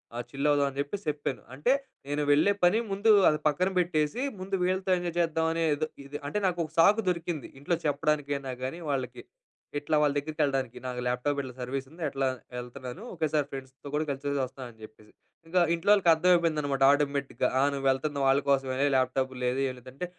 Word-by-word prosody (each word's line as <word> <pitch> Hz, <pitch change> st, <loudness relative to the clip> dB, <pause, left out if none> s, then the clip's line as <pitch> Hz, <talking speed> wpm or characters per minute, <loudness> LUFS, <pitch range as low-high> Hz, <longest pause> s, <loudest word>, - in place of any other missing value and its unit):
ఆహ్, 120 Hz, -, -3 dB
చిల్ 140 Hz, +1 st, -1 dB
అవుదాం 145 Hz, -1 st, +3 dB
అని 135 Hz, -, -12 dB
జెప్పేసి 165 Hz, +7 st, -3 dB
చెప్పాను. 145 Hz, -2 st, -3 dB
అంటే 145 Hz, -, +1 dB, 0.4 s
నేను 145 Hz, +1 st, -1 dB
వెళ్ళే 155 Hz, +8 st, +5 dB
పని 175 Hz, +5 st, +5 dB
ముందు 205 Hz, +3 st, +3 dB, 0.2 s
అది 150 Hz, -, +1 dB
పక్కన 180 Hz, +5 st, +2 dB
పెట్టేసి 175 Hz, -, 0 dB, 0.2 s
ముందు 195 Hz, +1 st, -2 dB
వీళ్ళతో 185 Hz, +1 st, 0 dB
ఎంజాయ్ 175 Hz, -1 st, -4 dB
చేద్దామని 165 Hz, 0 st, +1 dB
ఏదో 155 Hz, +2 st, -1 dB, 0.4 s
అంటే 210 Hz, -, -1 dB
నాకు 175 Hz, -1 st, -1 dB
ఒక 155 Hz, -, -12 dB
సాకు 205 Hz, +6 st, +6 dB
దొరికింది. 170 Hz, -3 st, -3 dB
ఇంట్లో 160 Hz, +5 st, 0 dB
చెప్పడానికైనా 145 Hz, -2 st, -1 dB
గానీ 135 Hz, +7 st, -4 dB
వాళ్ళకి 135 Hz, -2 st, -3 dB, 0.6 s
ఇట్లా 150 Hz, +1 st, -1 dB
వాళ్ళ 145 Hz, -1 st, +3 dB
దగ్గరికెళ్ళడానికి 140 Hz, -4 st, -1 dB
నాకు 125 Hz, -1 st, -4 dB
ల్యాప్‌టాప్ 135 Hz, +4 st, 0 dB
ఇట్లా 130 Hz, -2 st, -8 dB
సర్వీస్ 130 Hz, +2 st, -3 dB
ఉంది. 165 Hz, +2 st, -14 dB
అట్లా 135 Hz, -1 st, -1 dB, 0.3 s
వెళ్తున్నాను 125 Hz, -, -7 dB
ఒకేసారి 155 Hz, -4 st, 0 dB
ఫ్రెండ్స్‌తో 135 Hz, +1 st, -9 dB
కూడా 155 Hz, +1 st, 0 dB
కలిసేసి 140 Hz, +1 st, -2 dB
వస్తాను. 130 Hz, 0 st, -9 dB
అని 110 Hz, -, -23 dB
చెప్పేసి 110 Hz, 0 st, -19 dB, 0.4 s
ఇంకా 180 Hz, +2 st, +2 dB
ఇంట్లో 170 Hz, +4 st, -1 dB
వాళ్ళకి 190 Hz, -5 st, +3 dB
అర్థమైపోయిందనమాట 160 Hz, -5 st, +2 dB
ఆటోమేటిక్‌గా. 140 Hz, -1 st, 0 dB
ఆహ్, 140 Hz, -, +4 dB
"నువ్వు 135 Hz, -1 st, -4 dB
వెళ్తున్నావు 140 Hz, +1 st, 0 dB
వాళ్ళ 135 Hz, +1 st, +5 dB
కోసమేలే 135 Hz, 0 st, +2 dB
ల్యాప్‌టాపూ 130 Hz, 0 st, +1 dB
లేదు 125 Hz, +2 st, 0 dB
ఏమి 130 Hz, -, -3 dB
లేదు" 130 Hz, +1 st, -12 dB
అంటే 180 Hz, +6 st, -4 dB
145 Hz, 180 wpm, -28 LUFS, 135-165 Hz, 0.6 s, సాకు